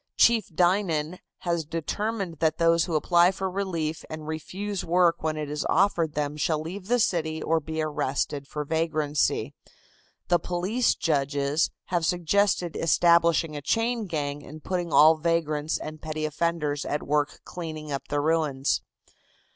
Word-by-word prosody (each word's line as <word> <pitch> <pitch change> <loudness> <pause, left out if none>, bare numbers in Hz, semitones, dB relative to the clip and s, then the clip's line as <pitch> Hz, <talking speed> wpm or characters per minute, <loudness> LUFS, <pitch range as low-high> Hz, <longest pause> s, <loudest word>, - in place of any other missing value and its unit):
Chief 230 -4 +4
Dinan 175 -2 +1 0.2
has 170 -2 -1
determined 170 +3 -3
that 160 -1 +1
those 165 0 +3
who 165 - -3
apply 175 +3 +4
for 190 0 -3
relief 170 -5 -2
and 155 -1 -7
refuse 190 +5 -4
work 175 0 +3
when 155 -1 -1
it 150 -1 -3
is 150 0 -3
offered 170 -4 +2
them 150 0 -2
shall 155 0 0
leave 180 +5 -7
the 245 +2 +3
city 160 -8 0
or 165 0 +2
be 160 +1 -3
arrested 140 -1 -2
for 150 0 -4
vagrancy. 155 -2 0 0.7
The 175 -1 +3
police 185 +8 0
judges 145 0 0 0.2
have 175 -2 +2
suggested 175 +1 +1
establishing 170 -1 +3
a 145 - -4
chain 225 - 0
gang 145 -3 -3
and 155 +1 -11
putting 175 -3 -2
all 155 +2 +7
vagrants 155 -2 0
and 155 0 -8
petty 155 -1 -3
offenders 155 -2 -1
at 145 - -2
work 145 0 0
clearing 155 -3 -6
up 140 - -4
the 145 0 0
ruins. 150 -3 +1
160 Hz, 150 wpm, -26 LUFS, 150-175 Hz, 0.7 s, all